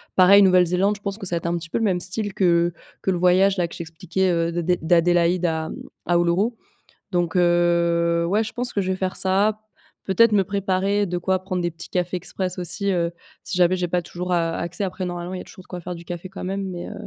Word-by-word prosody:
pareil 195 +2 +7
Nouvelle-Zélande, 185 +2 +3
je - - -24
pense 200 0 -3
que 200 - -7
ça 175 - -1
va - - +1
être 165 - -7
un 170 0 0
petit 165 0 -8
peu - - -1
le - - -1
même 185 -4 +1
style 200 +3 -1
que 170 -2 +2 0.3
que - - -2
le 185 - +1
voyage 185 +3 +4
là 175 -1 +1
que - - -13
je - - -9
t'expliquais, 170 +3 -2
heu, 170 0 0
de 175 +1 -2
d 180 +1 +1
d'Adélaïde 175 +1 +3
à, 160 -1 -2
mmh, - - -6 0.3
à 175 - +1
Uluru. 175 +6 +2 0.6
Donc, 175 -2 0
heu, 170 -1 +2
ouais, 210 +5 +2
je 215 - -7
pense 245 0 +1
que 200 - +1
je 190 - -1
vais 185 - -2
faire 185 -1 -2
ça. 200 +3 +2 0.5
Peut-être 215 +4 +4
me 200 -2 +4
préparer 200 +1 0
de 180 -1 -3
quoi 185 +1 0
prendre 185 -2 -2
des 175 - 0
petits 165 - -11
cafés 180 0 -1
express 185 +1 -4
aussi, 185 +3 -2
heu, 170 -2 0 0.3
si - - -5
jamais 180 0 +4
j'ai 180 -1 -1
pas 175 +1 0
toujours, 180 +1 -4
a 165 -1 +1
accès. 170 +3 -4
Après, 185 -1 -3
normalement, 175 +1 -5
il - - -4
y - - -6
a - - -8
toujours - - -14
de - - -26
quoi 180 - -6
faire 180 +1 -6
du 170 0 -11
café 175 +1 -6
quand 190 - -8
même 195 +2 -3
mais, 175 -1 -6
heu, - - -7
180 Hz, 260 wpm, -23 LUFS, 175-190 Hz, 0.6 s, pareil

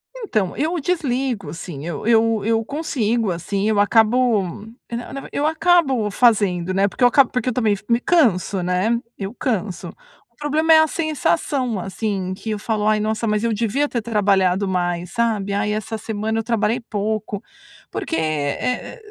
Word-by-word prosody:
Então, 220 - -2
eu 320 +4 0
desligo, 260 - -1
sim, 165 -3 -7
eu 170 +2 -5
eu 225 -2 +3
eu 225 0 +2
consigo, 235 - -1
assim, 195 +4 -2
eu 210 -2 +2
acabo, 225 +1 +3 0.5
é, 235 - -4
na 240 - -6
na 275 - -5
v - - -11
eu 290 - 0
acabo 315 -9 +2
fazendo, 195 -7 +2
né, 195 +1 +3
porque 245 - -3
eu - - +9
acabo 260 +1 +4
porque 250 0 -1
eu - - -2
também 225 -4 +2
f 195 - -12
me 235 0 +3
canso, 210 - +2
né, 185 +6 +1 0.2
eu 195 +2 -5
canso. 210 -8 -3 0.4
O - - -40
problema 310 +2 +3
é 315 - +8
a 315 - +4
sensação, 260 - -1
assim, 195 -1 -3
que 220 +4 -7
eu 210 - -2
falo: 215 -1 -1
"Ai, 215 0 +3
nossa, 220 +2 -1
mas 210 +1 0
eu 230 - +1
devia 235 +7 0
ter 235 -4 -2
trabalhado 200 -3 +2
mais." 175 -1 -1
Sabe? 220 -4 0
"Ai, 205 +1 0
essa 215 +1 -3
semana 220 +1 -2
eu 225 - -2
trabalhei 225 +1 0
pouco." 215 -2 -3 0.5
Porque, 325 - -3
eh 155 - -2
220 Hz, 180 wpm, -21 LUFS, 200-250 Hz, 0.5 s, eu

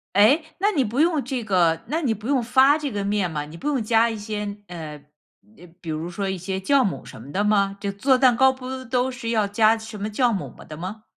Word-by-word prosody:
哎？ 220 +11 +6 0.2
那 410 +2 +2
你 300 - +1
不 240 +7 0
用 325 -3 +2
这 255 -2 -3
个 175 -6 +2
那 315 +5 -1
你 255 -8 +1
不 215 0 -11
用 275 -2 +2
发 265 +5 +4
这 300 -2 -3
个 205 -4 -3
面 200 -2 0
吗？ 150 -2 -3
你 155 +3 -11
不 285 - -6
用 275 -6 0
加 230 +1 +3
一 225 - -4
些 210 -1 -4
呃， 155 -4 -8 0.8
比 165 - -8
如 160 +2 -3
说 195 +2 -3
一 190 - -2
些 190 +2 -4
酵 260 +7 +2
母 190 - -3
什 110 - -11
么 140 +4 -11
的 200 - +1
吗？ 200 -2 +2
就 200 - -2
做 255 +7 +2
蛋 255 -2 +5
糕 265 0 +5
不 260 0 -7
都 250 +2 0
是 240 -2 -7
要 220 -3 +2
加 215 +2 +3
什 220 -1 -9
么 205 - -3
酵 240 +3 +1
母 195 -4 -3
吗 - - -12
的 155 - -10
吗？ 195 +6 -7
215 Hz, 270 characters per minute, -23 LUFS, 195-260 Hz, 0.8 s, 哎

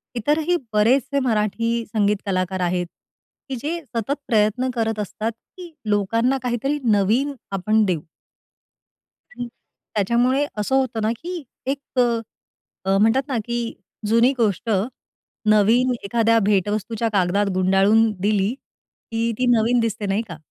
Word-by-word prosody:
इतरही 300 +8 +1 0.2
बरेचसे 260 +6 +3
मराठी 230 +1 0
संगीत 210 -1 +1
कलाकार 185 -1 -1
आहेत, 180 0 0 0.6
की 265 - -2
जे 330 +5 -2 0.2
सतत 230 +4 0
प्रयत्न 220 +3 +2
करत 225 -2 -1
असतात, 215 +2 -3
की 340 +9 -14 0.2
लोकांना 230 +6 +2
काहीतरी 250 +4 -1
नवीन 220 +8 +2 0.2
आपण 215 +3 +2
देऊ 180 -5 0 1.3
आणि 245 0 -6 0.5
त्याच्यामुळे 240 +7 +2
असं 210 +6 0
होतं 255 -4 0
ना, 215 +1 +1
की 350 -1 -5 0.3
एक 275 -2 -4
अ, 230 -4 -2
म्हणतात 225 +6 +3
ना, 260 -4 -1
की 240 0 -2 0.5
जुनी 230 +4 +4
गोष्ट 215 -1 0 0.8
नवीन 225 +5 +4
एखाद्या 230 +2 +2
भेटवस्तूच्या 210 +3 0
कागदात 195 +1 +2
गुंडाळून 195 +4 +4
दिली, 205 +1 +1
की 230 -3 -6
ती 255 - +1
नवीन 230 +2 +2
दिसते, 225 -2 -1
नाही 195 +2 0
का? 165 - -7
225 Hz, 125 wpm, -22 LUFS, 205-245 Hz, 1.3 s, जुनी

